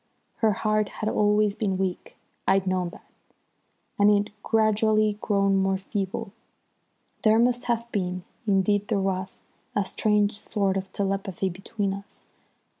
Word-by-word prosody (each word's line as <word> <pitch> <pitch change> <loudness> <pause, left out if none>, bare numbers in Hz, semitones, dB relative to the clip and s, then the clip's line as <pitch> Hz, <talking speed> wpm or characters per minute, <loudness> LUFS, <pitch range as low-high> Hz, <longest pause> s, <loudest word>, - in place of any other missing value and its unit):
Her 220 -2 +3
heart 215 0 0
had 215 - -3
always 210 -1 +3
been 200 -3 -1
weak, 185 -2 -3 0.3
I'd 195 0 +3
known 185 -2 0
that, - - -14 0.9
and 205 +1 +6
it - - +6
had 205 0 0
gradually 215 -1 +2
grown 200 -1 +2
more 195 0 +2
feeble. 195 0 -4 0.9
There 220 0 +5
must 245 +1 +2
have 235 -1 0
been, 180 -3 -2 0.2
indeed 205 +1 +2
there 215 - +1
was, 190 -1 -2 0.3
a 205 - +1
strange 210 +1 +1
sort 200 -4 0
of 190 -1 -3
telepathy 195 -1 -1
between 195 +2 -3
us. 200 +1 -10
205 Hz, 140 wpm, -26 LUFS, 190-215 Hz, 0.9 s, and